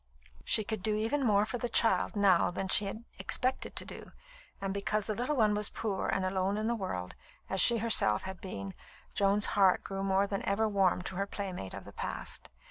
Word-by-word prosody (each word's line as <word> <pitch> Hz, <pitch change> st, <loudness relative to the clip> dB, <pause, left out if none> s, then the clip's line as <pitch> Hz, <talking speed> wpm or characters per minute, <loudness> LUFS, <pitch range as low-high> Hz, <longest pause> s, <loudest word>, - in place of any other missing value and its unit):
She 215 Hz, -, +3 dB
could 215 Hz, -1 st, -3 dB
do 215 Hz, +2 st, +1 dB
even 230 Hz, +7 st, 0 dB
more 210 Hz, -3 st, +3 dB
for 245 Hz, +3 st, -4 dB
the 245 Hz, -, -2 dB
child 230 Hz, 0 st, +2 dB
now 200 Hz, -4 st, +4 dB
than 190 Hz, +2 st, -4 dB
she 205 Hz, -, +6 dB
had 215 Hz, +4 st, -6 dB, 0.2 s
expected 255 Hz, +1 st, -1 dB
to -, -, -1 dB
do; -, -, -10 dB, 0.5 s
and 195 Hz, -1 st, -3 dB
because 200 Hz, +1 st, -1 dB
the 215 Hz, -, -2 dB
little 250 Hz, +7 st, -2 dB
one 215 Hz, -5 st, +3 dB
was 210 Hz, 0 st, -1 dB
poor 205 Hz, -4 st, -3 dB
and 190 Hz, -, 0 dB
alone 190 Hz, +2 st, 0 dB
in 215 Hz, -, -2 dB
the 235 Hz, -, +1 dB
world, 140 Hz, -, -4 dB, 0.4 s
as 190 Hz, -1 st, +2 dB
she 235 Hz, -, +5 dB
herself 215 Hz, -, +4 dB
had 190 Hz, -1 st, -7 dB
been, 100 Hz, -, -6 dB, 0.4 s
Joan's 200 Hz, +1 st, +3 dB
heart 195 Hz, -3 st, +4 dB
grew 195 Hz, 0 st, -5 dB
more 195 Hz, 0 st, +2 dB
than 200 Hz, 0 st, -3 dB
ever 215 Hz, +3 st, +1 dB
warm 195 Hz, -3 st, +1 dB
to 185 Hz, -, -6 dB
her 200 Hz, +1 st, -1 dB
playmate 185 Hz, -, -5 dB
of -, -, -9 dB
the -, -, -12 dB
past. -, -, -5 dB
200 Hz, 210 wpm, -31 LUFS, 190-220 Hz, 0.5 s, she